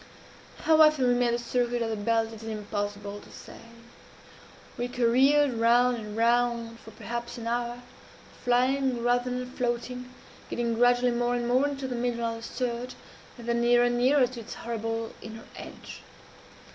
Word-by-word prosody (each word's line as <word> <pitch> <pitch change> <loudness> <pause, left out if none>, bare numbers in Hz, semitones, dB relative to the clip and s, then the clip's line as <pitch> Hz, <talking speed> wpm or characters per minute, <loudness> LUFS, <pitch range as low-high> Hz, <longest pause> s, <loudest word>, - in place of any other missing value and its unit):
"How 315 0 +5
often 305 -4 +5
we 245 - +4
made 245 -1 +2
the - - 0
circuit 240 0 -1
of 225 - -2
the - - -1
belt 225 +2 0
it 220 - -10
is 225 - -6
impossible 205 -1 -4
to - - -16
say. - - -12 1.2
We 245 0 -2
careered 260 +4 +3
round 240 +2 +3
and 210 -1 -7
round 235 0 +1
for 220 - -13
perhaps 235 +2 -6
an 230 - -7
hour, 240 +1 -2 0.6
flying 255 0 +2
rather 245 +1 +2
than 250 0 -4
floating, 250 0 -3 0.4
getting 235 -1 -1
gradually 245 +1 +3
more 240 0 0
and 240 -1 -2
more 255 +4 +3
into 275 -2 -4
the 255 - -4
middle 235 -1 -1
of 230 0 -2
the - - -10
surge, 245 +1 -4 0.4
and 235 -1 -10
then 235 0 +1
nearer 240 0 +4
and 240 0 +1
nearer 260 +2 +4
to 245 -1 -7
its 225 - -8
horrible 225 -1 -4
inner 225 +1 -9
edge. - - -10
240 Hz, 170 wpm, -27 LUFS, 230-250 Hz, 1.2 s, How